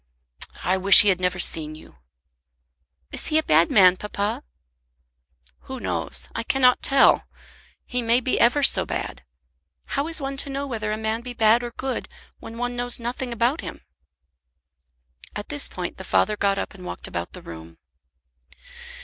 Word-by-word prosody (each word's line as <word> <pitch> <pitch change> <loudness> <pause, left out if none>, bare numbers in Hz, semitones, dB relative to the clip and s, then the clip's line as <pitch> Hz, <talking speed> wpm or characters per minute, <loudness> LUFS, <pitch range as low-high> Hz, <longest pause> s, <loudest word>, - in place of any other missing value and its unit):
"I 185 - +1
wish 195 +2 +9
he 205 - +3
had 185 -2 +1
never 180 0 0
seen 155 -3 +1
you." 155 - -17 1.1
"Is - - -3
he 310 - +1
a 315 - +2
bad 165 - +3
man, 185 -3 +5
papa?" 205 0 -4 1.2
"Who - - -8
knows? - - -3
I - - -3
cannot 250 +1 +2
tell. 270 -1 +3 0.6
He 250 0 -3
may 235 +1 +2
be 255 0 -1
ever 265 +5 +3
so - - +6
bad. - - -6 0.7
How 280 +2 -1
is 325 -1 +1
one 275 -1 -5
to 280 - -2
know 275 +1 -4
whether 220 -5 -4
a 215 - -3
man 220 +1 -3
be 245 0 -8
bad 225 0 +3
or 240 - -6
good 260 +2 -5 0.3
when 230 - -11
one 245 0 -4
knows 245 0 -1
nothing 245 +1 -5
about 240 +6 -1
him?" - - -9 1.5
At 210 - -7
this 290 -1 0
point - - -7
the - - -9
father 210 - 0
got 200 -1 0
up - - -5
and 185 -2 -13
walked 180 - -6
about 85 0 -6
the - - -11
room. 80 0 -12
230 Hz, 170 wpm, -22 LUFS, 195-255 Hz, 1.5 s, wish